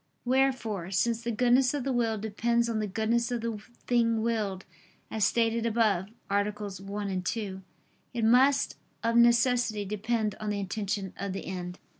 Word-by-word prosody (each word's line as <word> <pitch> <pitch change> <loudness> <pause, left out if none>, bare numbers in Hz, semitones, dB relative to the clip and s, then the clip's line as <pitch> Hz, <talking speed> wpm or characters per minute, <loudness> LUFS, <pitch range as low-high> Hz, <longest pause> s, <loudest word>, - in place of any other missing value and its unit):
Wherefore, 245 -8 +1
since 230 +4 +1
the 235 - -3
goodness 250 +3 +3
of 280 - -2
the 270 0 -1
will 230 -2 +1
depends 235 +3 0
on 225 -2 -1
the 215 - -1
goodness 225 +4 0
of 240 -2 -2
the 225 -2 -3 0.2
thing 230 -2 +2
willed, 210 -5 -1 0.5
as 220 -2 -1
stated 230 -1 +1
above 215 -5 +2 0.2
(AA. 200 +1 +2
1, 200 -1 -4
2), 190 0 -3 0.5
it 235 -3 -1
must, 265 +4 +4 0.3
of 230 0 +1
necessity, 235 -2 +4
depend 215 +1 -1
on 215 - -3
the 205 -1 -1
intention 200 0 -3
of 200 -1 -3
the 195 - -5
end. 180 -1 -5
220 Hz, 160 wpm, -29 LUFS, 200-235 Hz, 0.5 s, must